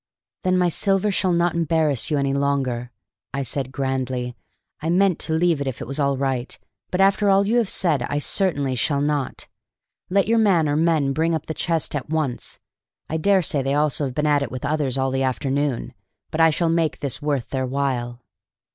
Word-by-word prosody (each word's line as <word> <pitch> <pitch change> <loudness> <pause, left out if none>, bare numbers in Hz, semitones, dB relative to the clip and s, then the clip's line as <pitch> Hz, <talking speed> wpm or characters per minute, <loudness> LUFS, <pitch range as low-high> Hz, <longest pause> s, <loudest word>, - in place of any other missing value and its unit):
"Then 185 0 +2
my 180 -1 +3
silver 195 +4 +1
shall 185 -1 +1
not 170 0 +2
embarrass 160 -5 +1
you 150 - +1
any 140 -1 0
longer," 135 -4 -1 0.5
said 135 +1 -2
I - - -15
grandly. 130 -2 -2 0.5
"I 160 - -2
meant 185 0 +3
to 160 - -1
leave 165 -2 +2
it 140 - -2
if 130 - -4
it - - -5
was 135 +5 -4
all 140 -1 +1
right, 130 -2 -2 0.3
but 180 - -2
after 200 +1 +4
all 195 +1 +4
you 225 +4 +2
have 225 -5 0
said 160 -8 +1
I 145 - -1
certainly 145 -4 0
shall 140 +3 0
not. 145 -2 -2 0.6
Let 195 0 +2
your 230 +1 +3
man 185 -8 +3
or 145 - +1
men 155 -3 +2
bring 165 +3 +1
up 160 - -4
the 160 - -4
chest 165 -1 -1
at 145 - -4
once. 155 -6 -2 0.5
I 160 - 0
dare 190 +3 +3
say 145 -2 0
they 135 +1 0
also 150 -1 +1
have 130 -2 -5
been 150 - 0
'at 145 -1 +3
it 140 - -2
with 130 +2 -5
others 140 -3 0
all 135 0 0
the 135 0 -1
afternoon,' 135 0 -1 0.4
but 160 - 0
I 165 - +7
shall 165 +2 0
make 165 -2 +1
this 140 0 -3
worth 145 -5 -1
their 130 -1 -2
while." 125 -3 -2
145 Hz, 210 wpm, -22 LUFS, 135-170 Hz, 0.6 s, I